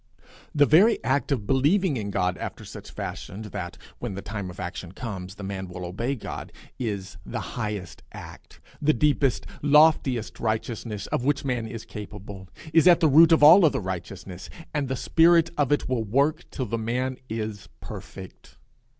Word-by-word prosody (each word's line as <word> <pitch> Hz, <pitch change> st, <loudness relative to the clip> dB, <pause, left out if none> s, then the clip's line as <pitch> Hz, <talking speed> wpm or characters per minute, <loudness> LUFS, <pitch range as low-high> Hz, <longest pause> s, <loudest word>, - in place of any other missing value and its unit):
The 145 Hz, -1 st, +6 dB
very 190 Hz, +11 st, +5 dB
act 140 Hz, 0 st, 0 dB
of 120 Hz, -7 st, 0 dB
believing 145 Hz, -, +2 dB
in 105 Hz, -4 st, -3 dB
God 90 Hz, -2 st, 0 dB
after -, -, -6 dB
such -, -, -10 dB
fashion 100 Hz, +4 st, -6 dB
that, 95 Hz, -4 st, -6 dB, 0.2 s
when 115 Hz, -6 st, -4 dB
the 100 Hz, -, -6 dB
time 100 Hz, -3 st, -5 dB
of 90 Hz, -, -11 dB
action 90 Hz, 0 st, -6 dB
comes, 95 Hz, -5 st, -6 dB
the 100 Hz, -, -9 dB
man 95 Hz, -1 st, -4 dB
will 90 Hz, 0 st, -7 dB
obey 115 Hz, +10 st, -2 dB
God, 115 Hz, -, -7 dB, 0.3 s
is 100 Hz, -6 st, -4 dB
the -, -, -5 dB
highest 100 Hz, -6 st, -4 dB
act, -, -, -12 dB, 0.2 s
the 155 Hz, +1 st, +3 dB
deepest, 145 Hz, -4 st, +1 dB, 0.2 s
loftiest 145 Hz, -5 st, +3 dB
righteousness 110 Hz, -1 st, -3 dB
of -, -, -2 dB
which 145 Hz, +1 st, 0 dB
man 120 Hz, -4 st, -1 dB
is 115 Hz, 0 st, -7 dB
capable, 100 Hz, -3 st, -9 dB, 0.2 s
is 165 Hz, +2 st, +6 dB
at 175 Hz, -1 st, +7 dB
the 165 Hz, -, +4 dB
root 160 Hz, +4 st, +7 dB
of 160 Hz, -2 st, +5 dB
all 170 Hz, +6 st, +9 dB
other 155 Hz, -, +3 dB
righteousness, 95 Hz, 0 st, -6 dB, 0.2 s
and 145 Hz, -3 st, -1 dB
the 130 Hz, -, -2 dB
spirit 165 Hz, +4 st, +4 dB
of 145 Hz, -2 st, +1 dB
it 145 Hz, -, +1 dB
will 125 Hz, -3 st, 0 dB
work 140 Hz, -, 0 dB
till 130 Hz, -, -4 dB
the 115 Hz, -1 st, -3 dB
man 125 Hz, +3 st, -2 dB
is 110 Hz, -2 st, -5 dB
perfect. -, -, -10 dB
115 Hz, 175 wpm, -25 LUFS, 100-145 Hz, 0.3 s, all